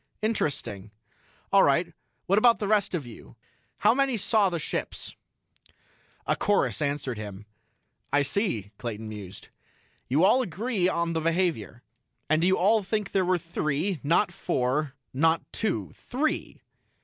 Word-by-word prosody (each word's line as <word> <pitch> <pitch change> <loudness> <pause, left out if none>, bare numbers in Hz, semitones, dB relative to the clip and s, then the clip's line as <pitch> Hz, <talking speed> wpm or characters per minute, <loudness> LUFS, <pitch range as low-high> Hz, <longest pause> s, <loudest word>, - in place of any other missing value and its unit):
"Interesting. 140 - -2 0.6
All - - +7
right, - - +2 0.3
what 195 +3 +3
about 235 +1 +5
the 205 - -3
rest 205 -3 +2
of 155 -6 -3
you? 110 - -12 0.4
How - - +4
many 270 -2 +1
saw 210 -1 +3
the 175 - -2
ships?" 155 - -4 1.1
A - - +1
chorus 205 -5 +1
answered 140 -5 -2
him. 105 -1 -8 0.7
"I 145 +1 +3
see," 140 - -1
Clayton 110 -2 -5
mused. 105 -4 -9 0.6
"You 145 +7 +2
all 220 +7 +5
agree 205 -1 -1
on 170 -1 -1
the 165 - -1
behavior. 165 - -1 0.5
And 155 +1 +3
you 190 +1 +4
all 210 +4 +4
think 210 +1 -2
there 190 - +2
were 180 0 +2
three 165 +1 -2
not 170 +6 +2
four 145 -3 -1 0.2
not 160 +5 +2
two. 145 - -2
Three?" 290 +5 -3
170 Hz, 140 wpm, -27 LUFS, 135-205 Hz, 1.1 s, All